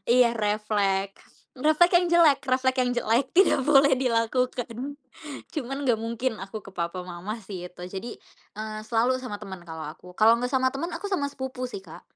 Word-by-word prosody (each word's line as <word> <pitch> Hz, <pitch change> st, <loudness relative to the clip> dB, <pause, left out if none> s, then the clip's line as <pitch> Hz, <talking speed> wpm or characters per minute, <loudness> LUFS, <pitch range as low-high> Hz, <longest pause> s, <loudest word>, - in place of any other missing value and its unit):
Iya 245 Hz, -2 st, +5 dB
reflek. 205 Hz, -2 st, 0 dB, 0.3 s
Reflek 310 Hz, +6 st, +3 dB
yang 355 Hz, -, 0 dB
jelek 335 Hz, -5 st, +5 dB
reflek 260 Hz, 0 st, +2 dB
yang 250 Hz, -1 st, +2 dB
jelek 240 Hz, +2 st, +2 dB
tidak 385 Hz, -6 st, +5 dB
boleh 280 Hz, -1 st, +6 dB
dilakukan, 250 Hz, +2 st, -1 dB, 0.6 s
cuman 270 Hz, -3 st, -3 dB
gak 245 Hz, -, +4 dB
mungkin 230 Hz, +2 st, -2 dB
aku 195 Hz, +3 st, -6 dB
ke 200 Hz, -2 st, -14 dB
papa 180 Hz, +1 st, -3 dB
mama 185 Hz, +6 st, -6 dB
sih 185 Hz, -4 st, -8 dB
itu 180 Hz, -, -13 dB
jadi, 195 Hz, +6 st, -7 dB, 0.4 s
eee, 215 Hz, 0 st, -5 dB
selalu 230 Hz, +3 st, +1 dB
sama 210 Hz, -5 st, -5 dB
temen 190 Hz, -4 st, -9 dB
kalau 160 Hz, -2 st, -7 dB
aku 165 Hz, +4 st, -10 dB
kalau 225 Hz, +2 st, +7 dB
gak 250 Hz, -, -1 dB
sama 260 Hz, 0 st, +1 dB
temen 335 Hz, +6 st, -3 dB
aku 405 Hz, -, -5 dB
sama 320 Hz, -8 st, -1 dB
sepupu 260 Hz, -2 st, -5 dB
sih, 200 Hz, -, -5 dB
Kak. 175 Hz, -4 st, -13 dB
230 Hz, 180 wpm, -26 LUFS, 200-260 Hz, 0.6 s, kalau